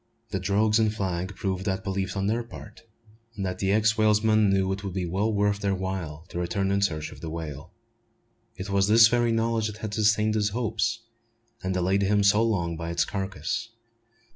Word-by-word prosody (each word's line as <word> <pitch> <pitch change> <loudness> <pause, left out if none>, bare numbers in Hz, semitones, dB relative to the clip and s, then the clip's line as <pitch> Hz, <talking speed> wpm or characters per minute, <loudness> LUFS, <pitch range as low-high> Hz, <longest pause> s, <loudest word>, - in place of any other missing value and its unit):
The 95 - -1
"drogues" 105 +4 +2
and 110 -1 +3
flag 95 -2 -3
proved 95 -1 -2
that 95 +1 -1
belief 95 -1 -2
on 95 - 0
their 110 +4 +1
part, 110 -2 -11 0.5
and 100 - -3
the 95 +1 -1
ex 110 +2 +3
whalesman 110 0 +4
knew 95 -1 +2
that 95 +1 -2
it - - -12
would 95 -2 -5
be 90 -2 -1
well 100 +6 0
worth 100 -1 +1
their 100 -2 0
while 90 -5 -4
to 85 - -5
return 95 +3 -1
in 100 0 +1
search 80 -6 -1
of - - -13
the 80 - -5
whale. 80 -4 -7 0.8
It 95 +2 -6
was 100 0 +3
this 110 +1 +8
very 120 -1 +2
knowledge 115 -1 +1
that 105 0 -7
had 110 -2 -5
sustained 110 0 +2
his 105 -1 +1
hopes, 115 +1 -1 0.6
and 95 - -2
delayed 95 +2 +1
him 100 +1 +2
so 105 +2 +5
long 90 -7 0
by 85 0 -5
its 85 0 +1
carcass. 100 +4 -3
100 Hz, 200 wpm, -26 LUFS, 95-110 Hz, 0.8 s, this